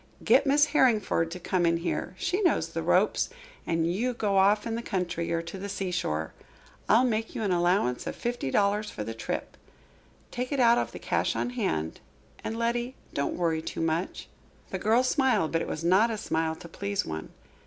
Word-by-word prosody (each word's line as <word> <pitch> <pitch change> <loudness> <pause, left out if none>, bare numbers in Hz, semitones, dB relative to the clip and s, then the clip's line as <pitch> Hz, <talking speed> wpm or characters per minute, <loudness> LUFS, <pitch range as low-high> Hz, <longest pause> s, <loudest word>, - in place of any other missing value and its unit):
Get 275 +2 +4
Miss 290 +2 +5
Harringford 215 - +3
to 180 +2 -6
come 180 +1 0
in 170 0 +3
here 170 +2 -3
she 370 - 0
knows 360 - +2
the - - -3
ropes - - +2 0.4
and 165 -1 +1
you 225 +9 0
go 205 -4 0
off 205 +2 +4
in 230 - -2
the 230 - -2
country 175 -6 -2
or 165 0 0
to 170 +3 -7
the 200 +1 -5
seashore. 175 - -2 0.6
I'll 230 +4 +6
make 225 -2 -1
you - - -2
an 200 - 0
allowance 175 -8 +1
of - - -3
fifty 240 - -3
dollars 205 +6 +1
for 105 - -5
the 115 +2 -5
trip. 115 - -4 0.8
Take 250 +2 -3
it 280 - 0
out 235 -1 +6
of - - -2
the - - -8
cash - - 0
on 245 - -1
hand. 80 - -2 0.4
And, 225 - -3
Letty, 240 +2 -1 0.2
don't 140 - -1
worry 165 -2 0
too - - -5
much." 165 +2 -2 0.4
The - - -2
girl 225 +4 +3
smiled, 260 - +2
but 165 - +1
it - - -3
was 155 - -4
not 190 +7 +4
a 225 - -2
smile 160 -4 -1
to 170 - -11
please 200 +4 -2
one. 80 0 -5
195 Hz, 200 wpm, -28 LUFS, 165-235 Hz, 0.8 s, I'll